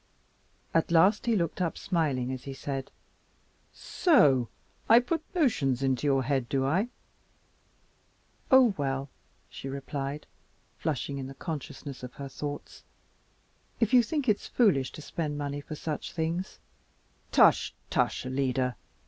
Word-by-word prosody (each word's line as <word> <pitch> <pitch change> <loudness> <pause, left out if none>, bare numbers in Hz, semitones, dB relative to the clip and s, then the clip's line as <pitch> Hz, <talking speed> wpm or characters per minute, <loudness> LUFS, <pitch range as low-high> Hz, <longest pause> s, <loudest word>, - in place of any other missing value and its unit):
At 165 - +2
last 185 +7 +4
he 230 - +3
looked 170 -1 -1
up, 170 -2 -1
smiling 140 -8 0
as 130 -1 -6
he 135 -1 -6
said, 135 -1 -4 0.8
"So 140 - +3 0.4
I 230 +2 +9
put 325 +7 -1
notions 140 - +2
into 135 +1 +1
your 135 -2 +3
head, 130 -3 -1
do 135 -1 +1
I?" 185 - +1 1.6
"Oh, 260 -5 +6
well," 135 -1 -2 0.4
she 135 - -8
replied, 140 +1 -4 0.5
flushing 140 -2 -2
in 130 - -5
the 135 - -9
consciousness 145 -3 -6
of 125 -1 -8
her 140 -1 -7
thoughts, 145 +1 -7 1.0
"if 230 +1 +1
you 250 - +8
think 275 +4 -2
it's 210 -2 +1
foolish 180 - +2
to 155 - -9
spend 150 -3 -3
money 145 0 -3
for 155 - -7
such 155 0 -5
things 170 +3 -2 0.4
" - - -38
"Tush, - - +5 0.2
tush, - - +1
Alida! 130 -1 0
145 Hz, 140 wpm, -29 LUFS, 135-185 Hz, 1.6 s, I